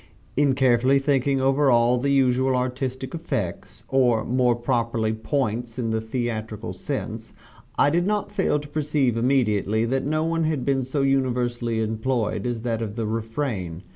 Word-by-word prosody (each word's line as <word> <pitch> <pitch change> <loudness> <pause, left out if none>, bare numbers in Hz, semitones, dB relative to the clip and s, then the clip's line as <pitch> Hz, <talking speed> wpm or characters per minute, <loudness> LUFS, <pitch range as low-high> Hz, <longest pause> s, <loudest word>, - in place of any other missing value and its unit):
In 140 -1 +3
carefully 130 0 +4
thinking 135 -1 +1
over 135 +1 +3
all 120 0 +4
the 140 +3 0
usual 130 -1 +3
artistic 130 +1 -3
effects 110 - -4
or 125 -4 +2
more 125 -1 +2
properly 115 -2 0
points, 115 0 -2
in 115 -3 -1
the 110 0 0
theatrical 110 -2 -4
sense - - -5 0.4
I 145 - +4
did 175 +3 +1
not 205 -1 -1
fail 195 -7 +1
to 145 0 -7
perceive 145 -4 0
immediately 115 -3 +1
that 135 +3 0
no 155 +2 0
one 165 0 0
had 155 -5 -1
been 135 -1 +1
so 135 +2 -1
universally 120 -4 0
employed 110 +2 -1
as 120 -2 -3
that 115 -2 -1
of 105 -2 -4
the 115 -2 -2
refrain. 110 - -3
125 Hz, 160 wpm, -24 LUFS, 115-135 Hz, 0.4 s, carefully